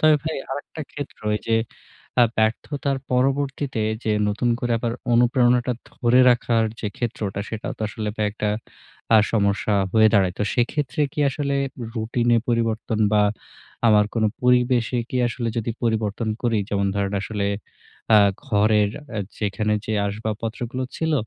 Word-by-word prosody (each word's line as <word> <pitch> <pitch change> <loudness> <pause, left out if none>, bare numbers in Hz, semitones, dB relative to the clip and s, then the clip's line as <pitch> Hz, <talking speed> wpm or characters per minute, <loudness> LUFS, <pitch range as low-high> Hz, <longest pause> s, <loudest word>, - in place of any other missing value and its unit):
তবে 155 0 +6
ভাই 160 - -2
আরেকটা 145 +3 -6
ক্ষেত্র 145 -1 -7
ওই 105 - +1
যে 115 0 +3 0.6
আ - - +8
ব্যর্থতার 135 +5 0
পরবর্তীতে 135 -1 0 0.2
যে 110 - +1 0.2
নতুন 110 +4 0
করে 120 -1 0
আবার 115 0 -2 0.2
অনুপ্রেরণাটা 120 +1 +3 0.2
ধরে 125 +1 +3
রাখার 115 -2 +2 0.2
যে 105 - -2
ক্ষেত্রটা, 105 -4 -3
সেটা 110 -1 -5
তো - - -27
আসলে 105 0 -4
ভাই 105 - +1
একটা 105 -1 -2 0.7
আ - - +8
সমস্যা 100 -1 +1 0.2
হয়ে 110 -1 +6
দাঁড়ায়। 95 -3 +3
তো - - 0
সেক্ষেত্রে 130 +3 -1
কি 150 - -3
আসলে 140 0 -2 0.4
রুটিনে 120 +1 +1
পরিবর্তন 115 -1 0 0.2
বা 105 - +5 0.7
আমার 105 -1 +5
কোন 115 -2 +1 0.2
পরিবেশে 125 -1 +3
কি - - -2
আসলে 115 0 -3
যদি 115 +1 -2
পরিবর্তন 110 -1 0
করি? 115 -3 +1
যেমন 100 -2 0
ধরেন 100 0 -1
আসলে 100 +1 -2 0.7
আ - - +9 0.3
ঘরের 105 -1 +3 0.2
অ্যা 110 - -4 0.2
যেখানে 105 +1 -1
যে 110 - -2
আসবাবপত্রগুলো 110 +4 -4
ছিল 160 -1 0
115 Hz, 145 wpm, -23 LUFS, 105-125 Hz, 0.7 s, আ